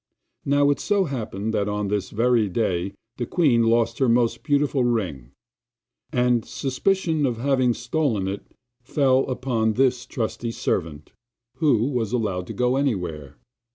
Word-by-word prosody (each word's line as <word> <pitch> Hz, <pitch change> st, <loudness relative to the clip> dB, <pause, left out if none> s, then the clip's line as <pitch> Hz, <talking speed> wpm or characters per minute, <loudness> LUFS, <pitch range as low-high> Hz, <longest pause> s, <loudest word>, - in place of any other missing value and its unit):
Now 145 Hz, 0 st, +3 dB
it 145 Hz, -, -1 dB
so 205 Hz, -1 st, +1 dB
happened 110 Hz, -, -4 dB
that 105 Hz, -1 st, 0 dB
on 105 Hz, 0 st, -2 dB
this 100 Hz, -2 st, -1 dB
very 115 Hz, -1 st, +2 dB
day 95 Hz, -2 st, -1 dB, 0.2 s
the 120 Hz, -, -3 dB
queen 145 Hz, -10 st, +3 dB
lost 115 Hz, 0 st, +2 dB
her 130 Hz, -3 st, +3 dB
most 115 Hz, 0 st, +2 dB
beautiful 145 Hz, -2 st, +1 dB
ring, 95 Hz, -, -1 dB, 0.8 s
and 125 Hz, -4 st, +2 dB
suspicion 160 Hz, -, -1 dB
of 120 Hz, -3 st, -2 dB
having 130 Hz, -1 st, +2 dB
stolen 120 Hz, -7 st, -1 dB
it 100 Hz, +1 st, -6 dB, 0.3 s
fell 135 Hz, +1 st, +2 dB
upon 120 Hz, -4 st, 0 dB
this 125 Hz, 0 st, +1 dB
trusty 115 Hz, 0 st, -3 dB
servant, 80 Hz, -9 st, -3 dB, 0.5 s
who 135 Hz, -9 st, +3 dB
was 120 Hz, -4 st, -2 dB
allowed 95 Hz, -7 st, -1 dB
to -, -, -6 dB
go 125 Hz, +1 st, +1 dB
everywhere. 85 Hz, -, -2 dB
120 Hz, 145 wpm, -23 LUFS, 105-135 Hz, 0.8 s, Now